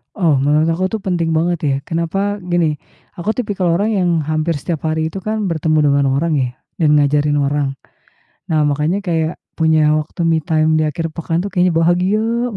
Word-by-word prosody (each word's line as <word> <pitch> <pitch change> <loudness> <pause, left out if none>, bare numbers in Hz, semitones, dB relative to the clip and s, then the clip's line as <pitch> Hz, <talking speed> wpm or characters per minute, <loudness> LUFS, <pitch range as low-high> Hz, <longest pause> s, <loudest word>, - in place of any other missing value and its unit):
Oh, 165 -7 +2
menurut 150 +2 +3
aku 185 - -2
tuh 220 - -2
penting 170 -3 0
banget 175 +1 +1
ya. 140 - +2
Kenapa? 170 +3 -2 0.3
Gini, 165 -3 +2 0.4
aku 175 +4 -3
tipikal 205 -6 -1
orang 205 +5 +1
yang 180 -1 +1 0.2
hampir 155 +2 0
setiap 165 +1 -4
hari 160 0 0
itu 165 - -7
kan 215 -2 -1
bertemu 160 -2 0
dengan 140 0 +3
orang 155 +4 0
ya, 130 -3 +1 0.3
dan 160 -3 +3
ngajarin 145 +1 +2
orang. 140 0 0 0.8
Nah, 155 -2 +2
makanya 150 +7 0
kayak 165 -2 -1 0.2
punya 160 -2 +3
waktu 155 +3 -9
me 165 -1 +2
time 155 -1 +1
di 155 - +1
akhir 165 +1 -4
pekan 170 +2 -2
tuh 200 - -5
kayaknya 180 -1 +2
bahagia 175 +5 +2 0.3
banget. 220 - -6
165 Hz, 185 wpm, -17 LUFS, 155-175 Hz, 0.8 s, menurut